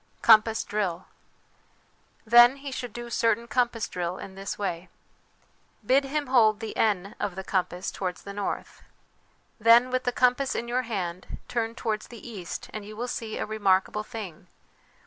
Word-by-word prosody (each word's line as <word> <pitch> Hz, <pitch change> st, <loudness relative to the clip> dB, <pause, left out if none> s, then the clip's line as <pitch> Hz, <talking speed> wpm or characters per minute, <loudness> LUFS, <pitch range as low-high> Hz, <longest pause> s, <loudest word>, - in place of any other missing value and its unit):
Compass 220 Hz, 0 st, +6 dB
Drill. 190 Hz, -4 st, -2 dB, 1.2 s
Then 240 Hz, +3 st, +8 dB
he 280 Hz, 0 st, -7 dB
should 245 Hz, -2 st, -5 dB
do 240 Hz, +2 st, -8 dB
certain 230 Hz, 0 st, +1 dB
compass 240 Hz, -2 st, 0 dB
drill 180 Hz, 0 st, -3 dB
in 190 Hz, -, -9 dB
this 195 Hz, 0 st, -5 dB
way: 185 Hz, -3 st, -3 dB, 1.0 s
Bid 270 Hz, +5 st, +4 dB
him 290 Hz, +2 st, -2 dB
hold 225 Hz, -5 st, +4 dB
the 225 Hz, -1 st, -6 dB
N 200 Hz, -3 st, 0 dB
of 195 Hz, -, -2 dB
the 190 Hz, -, -5 dB
compass 185 Hz, -1 st, -2 dB
towards 180 Hz, -3 st, -4 dB
the 200 Hz, -, -7 dB
north. 205 Hz, 0 st, -4 dB, 0.4 s
" -, -, -38 dB, 0.3 s
Then, 235 Hz, +3 st, +6 dB
with 255 Hz, 0 st, 0 dB
the 245 Hz, -, +2 dB
compass 250 Hz, +2 st, +2 dB
in 235 Hz, -, -3 dB
your 245 Hz, +2 st, 0 dB
hand, 180 Hz, -4 st, -4 dB
turn 230 Hz, -1 st, -2 dB
towards 220 Hz, -4 st, -3 dB
the 235 Hz, 0 st, -11 dB
east, 195 Hz, -7 st, -6 dB
and 215 Hz, -, -5 dB
you 210 Hz, +1 st, -10 dB
will 245 Hz, +2 st, -3 dB
see 225 Hz, -2 st, -4 dB
a -, -, -2 dB
remarkable 205 Hz, -1 st, +1 dB
thing. 205 Hz, -7 st, -8 dB
220 Hz, 165 wpm, -27 LUFS, 195-240 Hz, 1.2 s, Then